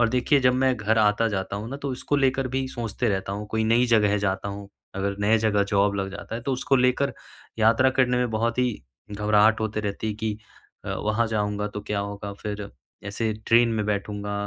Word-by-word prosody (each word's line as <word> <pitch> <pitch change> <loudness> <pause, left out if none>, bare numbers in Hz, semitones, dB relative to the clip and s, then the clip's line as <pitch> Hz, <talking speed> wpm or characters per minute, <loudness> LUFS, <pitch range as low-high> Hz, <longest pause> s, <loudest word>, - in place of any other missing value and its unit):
और 120 - +4
देखिए 125 +3 +2
जब 125 0 +3
मैं 130 0 +2
घर 110 +1 +1
आता-जाता 105 -2 +1
हूँ 110 +3 -5
न 140 - -3
तो 140 - -2
उसको 130 +3 -1
लेकर 135 -1 +1
भी 130 +1 -2
सोचते 120 -1 -3
रहता 95 -1 -2
हूँ। 105 +1 -5
कोई 110 0 0
नई 120 +3 +3
जगह 105 -3 +3
जाता 95 0 -1
हूँ 100 0 -7 0.3
अगर 100 +1 -2
नए 110 +2 +4
जगह 105 -2 +2
जॉब 100 0 +2
लग 95 -1 -2
जाता 100 +3 -6
तो 135 +2 -2
उसको 130 +1 +1
लेकर 125 +2 +2 0.5
यात्रा 115 +4 +4
करने 125 -1 +3
में 125 -1 0
बहुत 115 +2 -1
ही 125 -1 +3 0.4
घबराहट 105 +1 +3
होते 110 0 -2
रहती 105 +1 -3
कि 110 0 -2 0.5
अ, - - -7
वहाँ 110 +2 0
जाऊँगा 105 -1 -1
तो 105 - -6
क्या 105 0 -3
होगा? 100 0 -5
फिर 105 0 -6 0.4
ऐसे 110 +2 -1
ट्रेन 115 +1 +5
में 110 -2 -1
बैठूँगा 105 0 -3
110 Hz, 205 wpm, -25 LUFS, 100-120 Hz, 0.5 s, ट्रेन